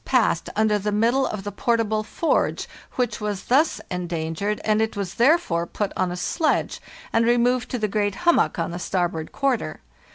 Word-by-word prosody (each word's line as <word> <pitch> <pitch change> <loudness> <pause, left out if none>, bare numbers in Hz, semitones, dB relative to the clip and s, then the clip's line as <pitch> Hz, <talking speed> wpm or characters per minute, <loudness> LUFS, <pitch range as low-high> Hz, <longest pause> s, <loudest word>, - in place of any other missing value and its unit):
51 255 - +3
passed 170 -5 -1
under 215 -1 +2
the 210 +1 -2
middle 235 +6 +2
of 210 -2 -5
the 205 - -4
portable 220 +1 0
forge, 315 +9 0 0.3
which 245 -4 -1
was 205 -2 -3
thus 290 +6 +2
endangered, 175 +3 -2
and 215 0 +2
it 220 -1 -1
was 195 -2 -3
therefore 235 - +2
put 205 +2 -3
on 185 -1 0
a 175 - -4
sledge 310 - 0 0.3
and 225 - +4
removed 240 +1 +2
to 250 - -2
the 215 -2 0
great 205 -1 0
hummock 345 - +3
on 165 0 -2
the 175 - -5
starboard 175 -3 -2
quarter. 255 - -1
210 Hz, 185 wpm, -23 LUFS, 180-240 Hz, 0.3 s, and